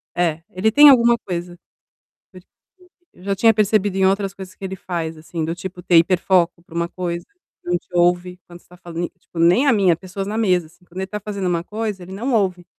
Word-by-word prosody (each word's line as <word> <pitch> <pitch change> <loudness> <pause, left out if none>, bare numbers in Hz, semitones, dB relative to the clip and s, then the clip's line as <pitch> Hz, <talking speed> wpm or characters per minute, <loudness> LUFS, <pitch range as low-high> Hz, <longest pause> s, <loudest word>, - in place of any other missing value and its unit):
É, 165 -2 0
ele 200 +5 +1
tem 295 +4 +8
alguma 235 -2 +5
coisa, 175 -2 -6 0.8
porque 185 0 -15 0.7
eu 180 - -18
já 200 0 -1
tinha 225 +3 +4
percebido 205 -2 +1
em 190 - +3
outras 195 0 0
coisas 185 -1 -10
que - - -15
ele 190 0 -5
faz, 165 -3 -5
assim, 160 +1 -5
do 165 - -2
tipo 180 0 -8
ter 175 - +4
hiperfoco 175 0 +2
para 165 - -17
uma 170 0 0
coisa, 175 -1 -4 0.4
não 175 0 0
te - - -19
ouve 175 +1 +1
quando 175 0 -13
você - - -29
tá 180 - -16
falando. 175 0 -5
Tipo, 175 - -16
nem 180 +12 +4
a 255 - +5
mim, 195 -4 +3
a - - +3
pessoas 190 +2 -6
na 215 +2 -3
mesa 180 -6 +2
assim. 175 +2 -25
Quando 175 +2 -15
ele 190 - -2
está 210 +2 -6
fazendo 200 -2 -4
uma 170 -1 0
coisa, 210 -2 -4
ele 185 - -11
não 240 +6 -3
ouve. 185 -5 0
185 Hz, 230 wpm, -20 LUFS, 175-200 Hz, 0.8 s, tem